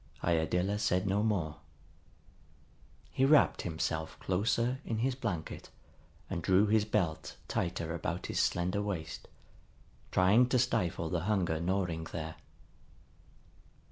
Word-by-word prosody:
Iadilla 90 +4 +1
said 95 -2 +1
no 100 +1 +1
more. 95 -9 0 1.5
He 130 - 0
wrapped 145 +2 +5
himself 80 -1 -3
closer 115 +7 0
in 115 - -3
his 130 +4 +1
blanket 105 -11 -4 0.6
and 85 - -3
drew 95 +4 +4
his 105 0 +3
belt 85 -7 -1
tighter 85 -2 -2
about 85 - -3
his - - -2
slender 90 +3 +1
waist, 85 -6 -4 0.8
trying 105 +7 +4
to 125 - +3
stifle 110 -9 0
the 85 -1 -1
hunger 90 -6 +1
gnawing 85 -2 -1
there. 80 -1 -6
90 Hz, 115 wpm, -32 LUFS, 85-105 Hz, 1.5 s, wrapped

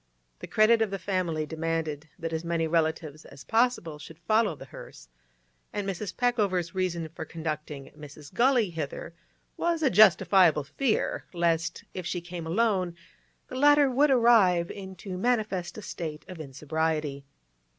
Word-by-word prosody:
The - - -8
credit 225 +1 +4
of 220 - +2
the 195 - -3
family 180 -5 -1
demanded 160 -1 -3
that 165 -2 -4
as 160 0 -2
many 170 -1 0
relatives 160 -1 -1
as 140 0 -13
possible 225 -10 +1
should 155 +2 -11
follow 215 +1 +1
the 135 - -11
hearse, 60 - -12 0.6
and 205 -1 -3
Mrs. 195 +1 -3
Peckover's 200 -9 +1
reason 175 -3 -1
for 160 - -7
conducting 155 -4 -6
Mrs. 150 -1 -12
Gully 245 -6 +3
hither 160 +1 -5 0.4
was 335 -2 0
a 270 - +3
justifiable 185 -5 +5
fear 215 - -1
lest, 165 -1 0
if 180 -2 -5
she 180 - -2
came 175 -1 -7
alone, 185 -2 +1 0.5
the - - -12
latter 290 0 +5
would 285 +4 +3
arrive 225 -9 +4
in 190 -1 -8
too 180 0 -7
manifest 210 -7 -1
a 215 - -7
state 155 -4 -6
of 185 -3 -9
insobriety. 150 0 -2
175 Hz, 150 wpm, -27 LUFS, 160-215 Hz, 0.6 s, justifiable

